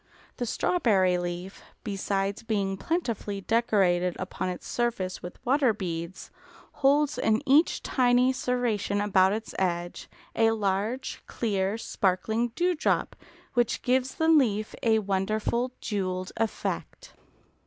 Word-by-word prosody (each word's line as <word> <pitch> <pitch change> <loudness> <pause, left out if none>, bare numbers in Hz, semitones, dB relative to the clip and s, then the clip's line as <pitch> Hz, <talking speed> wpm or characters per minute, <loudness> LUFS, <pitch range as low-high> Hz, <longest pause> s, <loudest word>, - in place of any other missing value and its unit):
The 245 - -2
strawberry 195 - +2
leaf, 175 +2 -5 0.2
besides 195 -1 -2
being 200 -4 -1
plentifully 225 - -2
decorated 190 -6 +2
upon 185 0 -3
its 180 - -6
surface 230 -7 -2
with 175 - -8
water 260 -2 +3
beads, 170 -2 -5 0.5
holds 290 +2 +3
in 220 +1 +1
each 290 +5 +4
tiny 250 0 +3
serration 240 -6 -1
about 190 -2 +4
its 220 +2 -4
edge 175 -2 -2 0.3
a 225 0 +4
large, 210 +4 -2
clear, 200 -2 -1
sparkling 220 +2 0
dewdrop, 355 -2 +1 0.4
which 240 -2 +1
gives 255 +1 +1
the 320 - +1
leaf 230 -10 +3
a 225 -1 +3
wonderful 215 +4 0
jewelled 185 -3 -2
effect. 225 -1 -3
215 Hz, 115 wpm, -27 LUFS, 190-245 Hz, 0.5 s, each